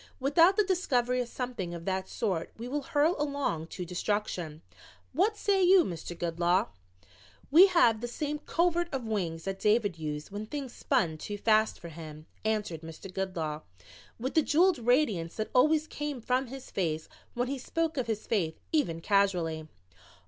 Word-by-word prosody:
Without 330 Hz, +8 st, +4 dB
the 425 Hz, -, +5 dB
discovery 250 Hz, -10 st, +1 dB
of 245 Hz, -, -3 dB
something 235 Hz, -9 st, -4 dB
of 170 Hz, 0 st, -8 dB
that 190 Hz, 0 st, -2 dB
sort 185 Hz, -7 st, -2 dB
we 235 Hz, +2 st, -6 dB
will 290 Hz, +3 st, -2 dB
hurl 295 Hz, +5 st, +2 dB
along 280 Hz, -, -1 dB
to 180 Hz, +1 st, -6 dB
destruction. 175 Hz, -3 st, -2 dB, 0.5 s
What 405 Hz, -, +2 dB
say 395 Hz, -2 st, +2 dB
you, 370 Hz, 0 st, +7 dB
Mr. 175 Hz, -, -6 dB
Goodloe?" 175 Hz, +2 st, +1 dB, 0.8 s
"We 350 Hz, +7 st, +9 dB
have 240 Hz, -, +4 dB
the 240 Hz, -, -2 dB
same 295 Hz, +4 st, -3 dB
'covert 345 Hz, +1 st, 0 dB
of 265 Hz, -4 st, -3 dB
wings' 175 Hz, -7 st, -2 dB
that 195 Hz, 0 st, -4 dB
David 210 Hz, -5 st, +2 dB
used 150 Hz, 0 st, -5 dB
when 205 Hz, +2 st, -5 dB
things 275 Hz, -1 st, -5 dB
spun 175 Hz, -, 0 dB
too 205 Hz, +5 st, -5 dB
fast 215 Hz, +1 st, +2 dB
for 170 Hz, -, -8 dB
him," 155 Hz, -1 st, -10 dB, 0.2 s
answered 210 Hz, -7 st, -1 dB
Mr. 165 Hz, +3 st, -10 dB
Goodloe 165 Hz, -6 st, -3 dB, 0.6 s
with 260 Hz, +4 st, -3 dB
the 320 Hz, -, +5 dB
jeweled 335 Hz, +3 st, +3 dB
radiance 225 Hz, -, +1 dB
that 215 Hz, -, -3 dB
always 305 Hz, +4 st, +4 dB
came 295 Hz, -3 st, -4 dB
from 250 Hz, +3 st, 0 dB
his 265 Hz, +1 st, -9 dB
face 160 Hz, -5 st, -1 dB, 0.3 s
when 245 Hz, +1 st, 0 dB
he 275 Hz, +1 st, -3 dB
spoke 330 Hz, +4 st, -1 dB
of 255 Hz, -4 st, -2 dB
his 215 Hz, -2 st, -2 dB
faith 170 Hz, -8 st, -1 dB
even 170 Hz, -, +1 dB
casually. 175 Hz, -6 st, +1 dB
220 Hz, 170 wpm, -30 LUFS, 175-290 Hz, 0.8 s, We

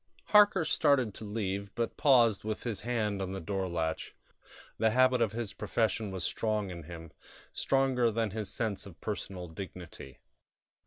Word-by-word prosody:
Harker 205 Hz, -5 st, +6 dB
started 140 Hz, -8 st, +3 dB
to -, -, -7 dB
leave, 100 Hz, -2 st, -3 dB
but 115 Hz, -1 st, -2 dB
paused, 120 Hz, -7 st, +4 dB
with 110 Hz, 0 st, -3 dB
his 110 Hz, -5 st, -3 dB
hand 105 Hz, -4 st, -1 dB
on 95 Hz, 0 st, -3 dB
the 95 Hz, -, -4 dB
door 95 Hz, +2 st, -2 dB
latch. 80 Hz, -2 st, -2 dB, 0.6 s
The 110 Hz, -, +4 dB
habit 130 Hz, +1 st, +4 dB
of 110 Hz, -3 st, +2 dB
his 115 Hz, -2 st, -3 dB
profession 110 Hz, -2 st, -1 dB
was 95 Hz, -3 st, -4 dB
strong 105 Hz, -3 st, -1 dB
in 85 Hz, -3 st, -8 dB
him 85 Hz, -1 st, -9 dB, 0.4 s
stronger 130 Hz, -3 st, +2 dB
than 110 Hz, -1 st, -1 dB
his 105 Hz, -2 st, -3 dB
sense 105 Hz, -3 st, -2 dB
of 90 Hz, -3 st, -13 dB
personal 95 Hz, -4 st, -5 dB
dignity. 85 Hz, -5 st, -9 dB
105 Hz, 160 wpm, -31 LUFS, 95-120 Hz, 0.6 s, Harker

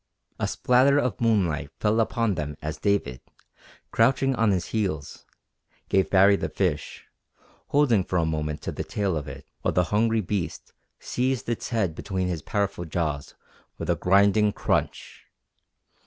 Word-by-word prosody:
A -, -, 0 dB
spatter 130 Hz, +3 st, +3 dB
of 125 Hz, -5 st, -1 dB
moonlight 90 Hz, -11 st, +1 dB
fell 110 Hz, +1 st, +2 dB
upon 115 Hz, -1 st, +1 dB
them 75 Hz, -3 st, -4 dB
as 75 Hz, +1 st, -5 dB
David, 85 Hz, -11 st, 0 dB, 0.7 s
crouching 135 Hz, +3 st, +3 dB
on 115 Hz, -3 st, +2 dB
his 95 Hz, -3 st, 0 dB
heels, 90 Hz, -10 st, -3 dB, 0.6 s
gave 95 Hz, -1 st, +2 dB
Baree 100 Hz, +1 st, +6 dB
the -, -, -3 dB
fish, 80 Hz, -7 st, -2 dB, 0.6 s
holding 130 Hz, -9 st, +3 dB
for 90 Hz, -, -2 dB
a 85 Hz, -, +2 dB
moment 75 Hz, -1 st, -3 dB
to -, -, -3 dB
the -, -, -4 dB
tail 100 Hz, -4 st, -2 dB
of 75 Hz, -2 st, -4 dB
it 70 Hz, 0 st, -9 dB, 0.2 s
while -, -, 0 dB
the 90 Hz, -, +3 dB
hungry 110 Hz, +1 st, +2 dB
beast 90 Hz, -5 st, -4 dB, 0.3 s
seized 130 Hz, 0 st, -2 dB
its 120 Hz, -, -3 dB
head 110 Hz, -8 st, 0 dB
between 95 Hz, +2 st, -3 dB
his 85 Hz, -4 st, -3 dB
powerful 100 Hz, 0 st, -2 dB
jaws 75 Hz, -4 st, -3 dB, 0.4 s
with 85 Hz, +1 st, -2 dB
a -, -, +2 dB
grinding 100 Hz, +3 st, +3 dB
crunch. -, -, -2 dB
95 Hz, 155 wpm, -25 LUFS, 80-110 Hz, 0.7 s, Baree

